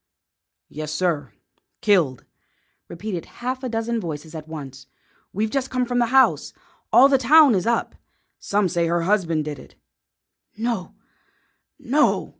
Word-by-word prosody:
"Yes, 155 0 -6
sir; 155 - -1 0.5
killed," 165 - +2 0.6
repeated 175 -1 -6
a - - -22
half 255 +1 -2
dozen 235 -2 -2
voices 160 -2 -7
at 155 -1 -8
once. 135 -4 -9 0.4
"We've 215 +3 -2
just 270 -1 -1
come 255 -1 0
from 245 0 -1
the 240 - +2
house. 265 +2 +3 0.4
All 265 - +7
the 275 -1 +3
town 290 +1 +6
is 190 +1 0
up. 235 -1 0 0.5
Some 200 -1 0
say 170 -1 0
her 170 0 0
husband 170 -5 0
did 150 -3 -6
it." - - -16 0.8
"No, 225 -4 -3 0.8
no!" 290 +5 +1
200 Hz, 140 wpm, -22 LUFS, 160-240 Hz, 0.8 s, All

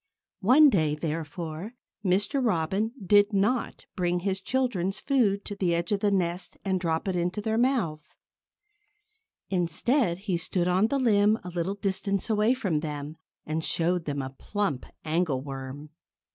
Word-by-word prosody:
One 265 +8 +6
day, 155 -6 +2
therefore, 160 +5 -5 0.3
Mr. 200 +8 +1
Robin 200 +1 0
did 205 +2 +5
not 210 +5 0
bring 175 -1 0
his 190 0 -1
children's 195 -5 -1
food 215 -8 +1
to 205 - -5
the 180 -4 +1
edge 170 +2 -2
of 205 - +2
the 205 - +2
nest 180 -2 -1
and 190 -1 +1
drop 165 0 -1
it 190 - 0
into 180 +3 -1
their 220 +2 0
mouths. 175 - 0 1.4
Instead, 180 - +1
he 190 -2 -2
stood 175 +1 -1
on 185 +4 +3
the 280 - 0
limb 215 -4 +4
a 180 - -6
little 175 +2 -2
distance 195 +1 -1
away 215 +4 +3
from 190 - 0
them 150 0 -5 0.3
and 155 +1 -2
showed 170 +1 0
them 140 -2 -2
a 130 - -5
plump 160 0 -3 0.2
angleworm. 145 -3 -2
185 Hz, 150 wpm, -27 LUFS, 165-210 Hz, 1.4 s, One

